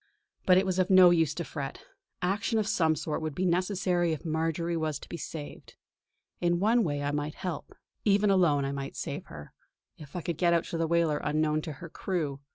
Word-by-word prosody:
But 185 -1 +7
it 190 - +3
was 190 -1 0
of 185 +1 +2
no 185 -2 +8
use 160 -4 +2
to 170 - -3
fret; 140 -4 -6 0.4
action 200 +5 0
of 215 - +1
some 160 -5 +2
sort 155 +1 -3
would 155 -2 -4
be 185 - 0
necessary 180 -1 +1
if 155 - -7
Marjory 165 +1 -1
was 155 -2 -1
to - - -12
be - - -6
saved. 155 -2 -8 0.6
In 175 0 +1
one 225 +4 +3
way 145 -5 -2
I 145 - 0
might 145 +1 -3
help. 180 -5 -5 0.3
Even 205 0 +3
alone 160 -7 +3
I 135 - -2
might 140 -1 -5
save - - -5
her, 75 - -11 0.5
if 150 0 -12
I 175 - -2
could 165 -1 -3
get 175 -1 +4
out 170 - +2
to 170 - -5
the 165 - +1
whaler 165 -2 +2
unknown 155 0 0
to 155 -1 -6
her 170 +5 -9
crew. 155 -6 -3
165 Hz, 215 wpm, -29 LUFS, 150-180 Hz, 0.6 s, no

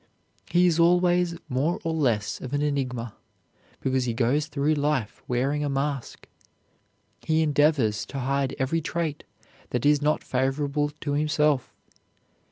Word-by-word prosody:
He 175 +1 +4
is 170 -2 +2
always 175 0 +3
more 145 +5 0
or 165 - -1
less 120 -10 0
of 130 +1 -6
an 145 +1 +1
enigma, 125 -6 -2 0.7
because 130 -1 0
he 120 -2 -2
goes 135 +6 +1
through 150 0 0
life 145 -6 -1
wearing 135 +4 0
a 145 - -1
mask. 140 -1 -3 0.9
He 160 0 +1
endeavors 145 -8 +2
to 140 - -7
hide 135 +1 -1
every 145 +4 0
trait 160 -2 -3 0.4
that 125 +2 -2
is 145 0 +4
not 150 +1 +1
favorable 140 +3 0
to 145 - -2
himself. 150 -2 +1
145 Hz, 140 wpm, -26 LUFS, 130-155 Hz, 0.9 s, He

